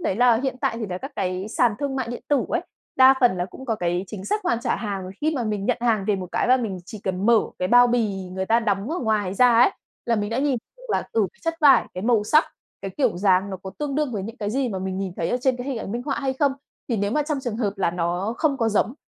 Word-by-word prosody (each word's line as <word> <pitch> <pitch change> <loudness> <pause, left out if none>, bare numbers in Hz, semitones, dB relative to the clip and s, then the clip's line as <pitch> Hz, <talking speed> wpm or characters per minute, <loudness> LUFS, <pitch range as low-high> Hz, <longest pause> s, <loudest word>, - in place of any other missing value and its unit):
đấy 195 - -1
là 240 -1 +5
hiện 265 -2 -1
tại 270 -5 0
thì 220 - -3
là 180 -1 -4
các 270 - -8
cái 185 0 -2
sàn 225 -1 +2
thương 280 -2 -2
mại 260 -3 -2
điện 240 - -6
tử 290 -2 +2
ấy, - - 0 0.4
đa 260 0 +8
phần 240 -8 +4
là 175 - -1
cũng 230 +8 -11
có 225 - +1
cái 175 -1 -1
chính 190 0 -8
sách 420 - -1
hoàn 240 -10 +1
trả - - 0
hàng, 195 -4 -4
khi 310 +1 +1
mà 250 -4 -1
mình 210 -2 -2
nhận - - +2
hàng 225 -4 +1
về 205 - +3
một 185 -1 -6
cái - - 0
là 255 - +6
mình 220 -7 -3
chỉ 215 - -8
cần 190 +1 -1
mở 230 -2 +6 0.2
cái 180 - -1
bao 245 +2 +7
bì 235 -4 +1 0.2
người 190 0 -3
ta 230 +3 +3
đóng 205 +2 -1
ở 345 - -1
ngoài 210 -5 0
ra 250 +3 +5
ấy, 250 - +6 0.4
là 235 -1 +2
mình 205 0 -2
đã 230 - -1
nhìn 275 -1 +1 0.2
được - - -19
là - - +1
từ 220 -3 +2 0.2
chất 330 0 -1
vải, 275 -5 +6
cái 185 - -5
màu 225 -2 +2
sắc, 305 +8 +4 0.4
cái 195 - -4
kiểu 255 -9 +1
dáng 190 +1 +2
nó 190 - -4
có 190 - -6
tương 295 -2 -2
đương 295 -3 0
với 200 - -3
những 225 +5 -7
cái 205 -1 -3
gì 260 +2 0
mà 195 -4 -3
mình 190 0 -3
nhìn 190 -2 -3
thấy 165 - -1
ở 245 - +2
trên 255 0 +2
cái 245 +1 -6
hình 270 -4 -2
ảnh 200 - -5
minh 240 +1 -3
họa 275 +1 -2
hay 270 -2 0
không. 275 +1 +1 0.4
Thì 235 - 0
nếu 200 0 0
mà 300 - +1
trong 295 -1 -2
trường 240 -5 -4
hợp 210 -4 -1
là 185 - +1
nó 175 +5 -2
không 300 -4 +1
có 230 -4 +1
giống, 225 +3 +1
225 Hz, 300 wpm, -23 LUFS, 195-260 Hz, 0.4 s, đa